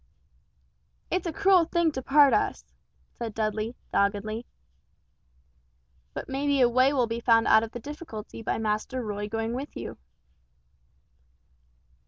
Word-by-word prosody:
"It's 365 Hz, 0 st, 0 dB
a -, -, -1 dB
cruel 385 Hz, -1 st, +4 dB
thing 340 Hz, -1 st, +1 dB
to 265 Hz, -, -4 dB
part 280 Hz, +1 st, +5 dB
us!" -, -, 0 dB, 0.5 s
said 230 Hz, -3 st, -6 dB
Dudley, 215 Hz, +2 st, -2 dB, 0.2 s
doggedly. 210 Hz, +3 st, 0 dB, 1.7 s
"But -, -, -5 dB
may 270 Hz, +2 st, -2 dB
be 285 Hz, -1 st, +2 dB
a 250 Hz, -, +6 dB
way 255 Hz, +3 st, +4 dB
will 260 Hz, -4 st, +2 dB
be 230 Hz, 0 st, -3 dB
found 230 Hz, -1 st, +4 dB
out 220 Hz, -, +6 dB
of 225 Hz, 0 st, -5 dB
the 240 Hz, -, -6 dB
difficulty 235 Hz, -6 st, -8 dB
by 225 Hz, -, -1 dB
Master 220 Hz, +4 st, -2 dB
Roy 205 Hz, -1 st, -4 dB
going 225 Hz, +1 st, -2 dB
with 275 Hz, +4 st, -6 dB
you." -, -, -7 dB
240 Hz, 140 wpm, -27 LUFS, 220-285 Hz, 1.7 s, a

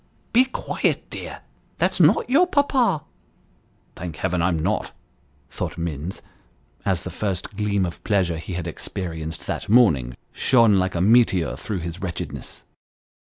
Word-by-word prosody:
" -, -, -38 dB
Be 250 Hz, +3 st, +6 dB
quiet, 260 Hz, -, -1 dB
dear, -, -, -7 dB, 0.4 s
that's -, -, +1 dB
not -, -, +5 dB
your 310 Hz, +8 st, +4 dB
papa." 260 Hz, -, +2 dB, 0.5 s
" -, -, -38 dB
Thank 85 Hz, -3 st, -6 dB
Heaven 90 Hz, +3 st, -1 dB
I 85 Hz, -, +3 dB
am 90 Hz, -3 st, +1 dB
not! 80 Hz, -, -1 dB, 0.3 s
" 70 Hz, -1 st, -37 dB
thought 65 Hz, -, -4 dB
Minns, 85 Hz, +1 st, -4 dB, 0.6 s
as 95 Hz, -3 st, +1 dB
the -, -, -5 dB
first 95 Hz, -4 st, -3 dB
gleam 100 Hz, -2 st, +1 dB
of 85 Hz, -1 st, -7 dB
pleasure 90 Hz, -6 st, +1 dB
he 90 Hz, -, -7 dB
had 85 Hz, -1 st, -3 dB
experienced 80 Hz, -1 st, -5 dB
that -, -, -4 dB
morning 80 Hz, -, +4 dB, 0.2 s
shone 115 Hz, -6 st, +4 dB
like 95 Hz, 0 st, -1 dB
a 85 Hz, -, 0 dB
meteor 105 Hz, -4 st, +4 dB
through 100 Hz, -5 st, -4 dB
his 85 Hz, +2 st, -6 dB
wretchedness. 90 Hz, -3 st, -6 dB
90 Hz, 155 wpm, -23 LUFS, 85-110 Hz, 0.6 s, Be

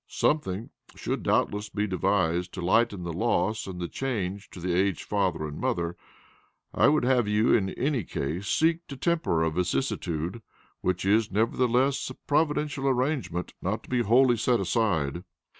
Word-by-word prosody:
"Something 110 Hz, -9 st, -1 dB, 0.2 s
should -, -, -3 dB
doubtless 105 Hz, 0 st, 0 dB
be 105 Hz, +1 st, -1 dB
devised 90 Hz, -2 st, 0 dB
to 90 Hz, -, -4 dB
lighten 100 Hz, 0 st, +2 dB
the 85 Hz, -1 st, -4 dB
loss 110 Hz, +2 st, 0 dB
and 90 Hz, -2 st, -6 dB
the 85 Hz, -, -3 dB
change 100 Hz, -5 st, -3 dB
to -, -, -11 dB
the 90 Hz, 0 st, -1 dB
aged 95 Hz, -1 st, +1 dB
father 95 Hz, -6 st, -1 dB
and 75 Hz, -, -7 dB
mother. 85 Hz, 0 st, -1 dB, 0.8 s
I -, -, +4 dB
would 150 Hz, -1 st, +3 dB
have 125 Hz, -3 st, +3 dB
you 105 Hz, +2 st, +3 dB
in 95 Hz, -3 st, +2 dB
any 135 Hz, -3 st, 0 dB
case 85 Hz, +7 st, -4 dB
seek 165 Hz, +1 st, +1 dB
to 140 Hz, -, -8 dB
temper 160 Hz, -, +1 dB
a 80 Hz, -, +1 dB
vicissitude, 90 Hz, -, -2 dB, 0.4 s
which 90 Hz, 0 st, -1 dB
is 110 Hz, +2 st, +3 dB
nevertheless 125 Hz, +6 st, +1 dB
a 130 Hz, -, -8 dB
providential 150 Hz, -2 st, 0 dB
arrangement 130 Hz, -, -1 dB
not 100 Hz, +4 st, -2 dB
to -, -, -16 dB
be 125 Hz, -1 st, +2 dB
wholly 120 Hz, +2 st, +4 dB
set 120 Hz, +2 st, +2 dB
aside." 90 Hz, -, 0 dB
105 Hz, 160 wpm, -27 LUFS, 90-125 Hz, 0.8 s, I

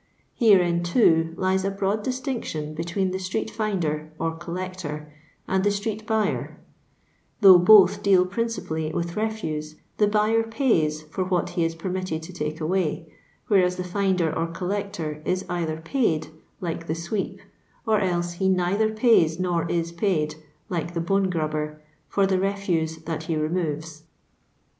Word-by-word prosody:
Herein, 180 Hz, -7 st, +4 dB
too, 165 Hz, -3 st, +3 dB
lies 190 Hz, 0 st, +1 dB
a 195 Hz, -, +1 dB
broad 200 Hz, +2 st, -1 dB
distinctiod 250 Hz, -, -3 dB
between 170 Hz, +4 st, -1 dB
the 190 Hz, -, -3 dB
atreet 190 Hz, +4 st, -3 dB
finder, 170 Hz, -9 st, -2 dB
or 165 Hz, 0 st, -1 dB
collector, 170 Hz, -3 st, -6 dB, 0.3 s
and 190 Hz, 0 st, +1 dB
the 205 Hz, -, +4 dB
street 215 Hz, +2 st, -3 dB
buyer: 220 Hz, -2 st, -1 dB, 0.8 s
though 190 Hz, -3 st, +9 dB
both 190 Hz, +1 st, +7 dB
deal 190 Hz, -2 st, +4 dB
principally 185 Hz, -7 st, -2 dB
with 170 Hz, +1 st, -3 dB
refuse, 160 Hz, -9 st, -3 dB, 0.2 s
the 210 Hz, -, +4 dB
buyer 215 Hz, +2 st, +3 dB
pays 225 Hz, -, +1 dB
for 160 Hz, +5 st, -3 dB
what 180 Hz, -1 st, 0 dB
he 170 Hz, -, 0 dB
is 165 Hz, 0 st, -1 dB
permitted 180 Hz, -1 st, -3 dB
to 185 Hz, +3 st, -9 dB
take 155 Hz, -2 st, -4 dB
away; 160 Hz, -1 st, -1 dB, 0.3 s
whereas 180 Hz, -3 st, +3 dB
the 180 Hz, -, -3 dB
finder 180 Hz, -3 st, 0 dB
or 165 Hz, -, 0 dB
collector 180 Hz, -3 st, -4 dB
is 185 Hz, +3 st, -1 dB
either 165 Hz, -3 st, -2 dB
paid 165 Hz, -, 0 dB, 0.3 s
(like 165 Hz, -1 st, -4 dB
the 160 Hz, -, -1 dB
sweep), 170 Hz, +5 st, -3 dB, 0.5 s
or 220 Hz, -2 st, +3 dB
else 175 Hz, -2 st, 0 dB
he 190 Hz, +2 st, 0 dB
neither 190 Hz, +4 st, +2 dB
pays 215 Hz, -8 st, +3 dB
nor 175 Hz, -2 st, 0 dB
is 170 Hz, -1 st, -1 dB
paid 170 Hz, -4 st, 0 dB, 0.3 s
(like 175 Hz, -3 st, -3 dB
the -, -, 0 dB
bone 195 Hz, +3 st, +1 dB
grubber), 155 Hz, -2 st, -2 dB, 0.3 s
for 200 Hz, -, +2 dB
the 190 Hz, -1 st, +1 dB
refuse 185 Hz, -5 st, -1 dB
that 160 Hz, -1 st, -4 dB
he 165 Hz, -, -1 dB
removes. 155 Hz, -1 st, -2 dB
180 Hz, 150 wpm, -25 LUFS, 160-200 Hz, 0.8 s, though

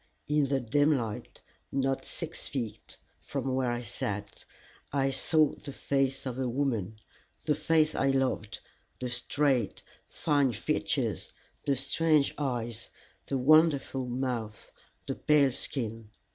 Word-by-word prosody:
In 150 Hz, 0 st, +3 dB
the 135 Hz, 0 st, +1 dB
dim 145 Hz, +5 st, +3 dB
light, 110 Hz, -4 st, -5 dB, 0.3 s
not 135 Hz, 0 st, 0 dB
six 165 Hz, -1 st, -6 dB
feet 115 Hz, -5 st, -5 dB, 0.2 s
from 135 Hz, -, -3 dB
where 130 Hz, -2 st, +1 dB
I 120 Hz, 0 st, -2 dB
sat, 105 Hz, -2 st, -5 dB, 0.5 s
I 135 Hz, -1 st, +2 dB
saw 150 Hz, +3 st, +3 dB
the 140 Hz, -, -8 dB
face 135 Hz, 0 st, 0 dB
of 130 Hz, -1 st, -3 dB
a 130 Hz, -2 st, 0 dB
woman, 115 Hz, -6 st, -1 dB, 0.5 s
the 150 Hz, -, +3 dB
face 155 Hz, +1 st, +3 dB
I 135 Hz, -, +2 dB
loved, 135 Hz, -5 st, 0 dB, 0.4 s
the 125 Hz, -, -3 dB
straight, 130 Hz, -2 st, +1 dB, 0.2 s
fine 145 Hz, -5 st, +1 dB
features, 115 Hz, -, -1 dB, 0.4 s
the 140 Hz, -, +4 dB
strange 150 Hz, +2 st, +2 dB
eyes, 120 Hz, -5 st, -2 dB, 0.4 s
the 135 Hz, -, 0 dB
wonderful 140 Hz, -2 st, +4 dB
mouth, 120 Hz, -4 st, -3 dB, 0.3 s
the -, -, -2 dB
pale 145 Hz, -3 st, +4 dB
skin. 115 Hz, -4 st, -4 dB
135 Hz, 130 wpm, -30 LUFS, 120-145 Hz, 0.5 s, the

